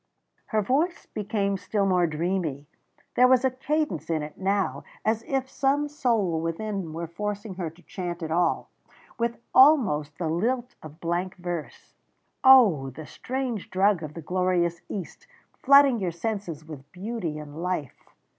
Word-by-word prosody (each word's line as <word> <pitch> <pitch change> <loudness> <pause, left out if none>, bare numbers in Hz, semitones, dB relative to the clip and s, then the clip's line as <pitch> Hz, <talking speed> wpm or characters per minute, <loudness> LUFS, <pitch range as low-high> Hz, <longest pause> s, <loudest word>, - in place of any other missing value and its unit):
Her 215 -2 +1
voice 300 - 0
became 200 -1 -1
still 200 +2 -1
more 180 -2 +3
dreamy; 160 -3 -2 0.5
there 250 - +6
was 255 0 +4
a 260 - +3
cadence 255 - -2
in 160 -2 0
it 150 - -8
now 195 0 -1 0.2
as 220 +1 +1
if 270 -1 -1
some 280 +2 +1
soul 230 - 0
within 180 +1 -3
were 165 +2 -4
forcing 205 +4 -4
her 180 -3 -4
to 165 +3 -20
chant 175 -2 -5
it 160 - -4
all, 170 0 +1 0.5
with 235 0 0 0.2
almost 215 - +5
the 170 - -2
lilt 240 +10 -1
of 155 +1 -11
blank 175 +2 -2
verse. 175 -3 -6 0.5
"Oh! 220 - +7
the 150 +4 -9
strange 250 - -4
drug 190 -1 +2
of 155 -1 -7
the 165 - -7
glorious 175 -1 0
East, 205 - -7 0.3
flooding 275 -3 +6
your 185 -3 -1
senses 170 -4 -4
with 145 -3 -11
beauty 190 -4 -4
and 150 +1 -8
life. 180 -6 -4
185 Hz, 155 wpm, -26 LUFS, 165-235 Hz, 0.5 s, Oh